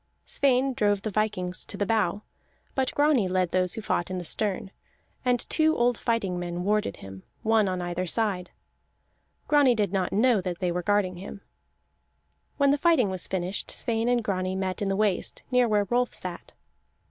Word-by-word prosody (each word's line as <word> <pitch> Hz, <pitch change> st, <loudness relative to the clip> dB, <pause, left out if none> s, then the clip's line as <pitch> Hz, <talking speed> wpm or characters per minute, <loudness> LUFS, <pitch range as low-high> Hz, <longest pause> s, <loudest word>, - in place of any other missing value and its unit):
Sweyn 265 Hz, -1 st, +2 dB
drove 205 Hz, -3 st, +1 dB
the 215 Hz, -, -2 dB
vikings 185 Hz, -3 st, -1 dB
to 200 Hz, -, -9 dB
the 205 Hz, -, 0 dB
bow; 215 Hz, -1 st, 0 dB, 0.5 s
but 265 Hz, -1 st, 0 dB
Grani 290 Hz, -8 st, +3 dB
led 185 Hz, -1 st, 0 dB
those 185 Hz, -1 st, +2 dB
who 225 Hz, -, -5 dB
fought 175 Hz, -4 st, -1 dB
in 185 Hz, -, -3 dB
the 180 Hz, -, -4 dB
stern, 195 Hz, 0 st, -2 dB, 0.5 s
and 250 Hz, -2 st, +1 dB
two 315 Hz, 0 st, +2 dB
old 240 Hz, 0 st, +3 dB
fighting 205 Hz, -7 st, -1 dB
men 175 Hz, 0 st, -4 dB
warded 210 Hz, -, 0 dB
him, 95 Hz, 0 st, -10 dB, 0.2 s
one 220 Hz, -2 st, +3 dB
on 185 Hz, -1 st, -2 dB
either 175 Hz, +1 st, -3 dB
side. 190 Hz, -3 st, -1 dB, 1.0 s
Grani 285 Hz, -4 st, +5 dB
did 205 Hz, -3 st, 0 dB
not 190 Hz, -2 st, 0 dB
know 225 Hz, 0 st, +3 dB
that 180 Hz, -2 st, -4 dB
they 180 Hz, -1 st, -1 dB
were 180 Hz, +1 st, -2 dB
guarding 190 Hz, -1 st, +1 dB
him. 195 Hz, +2 st, -9 dB, 1.2 s
When 280 Hz, -1 st, +4 dB
the 285 Hz, -, +1 dB
fighting 290 Hz, -, +3 dB
was 185 Hz, -1 st, -2 dB
finished, 185 Hz, +1 st, -2 dB
Sweyn 230 Hz, 0 st, 0 dB
and 245 Hz, -1 st, +2 dB
Grani 185 Hz, -2 st, -1 dB
met 190 Hz, 0 st, -3 dB
in 200 Hz, -, 0 dB
the 195 Hz, -, 0 dB
waist, 205 Hz, -2 st, 0 dB
near 250 Hz, -1 st, +4 dB
where 210 Hz, -2 st, +2 dB
Rolf 245 Hz, +4 st, 0 dB
sat. -, -, -7 dB
205 Hz, 180 wpm, -26 LUFS, 185-240 Hz, 1.2 s, Grani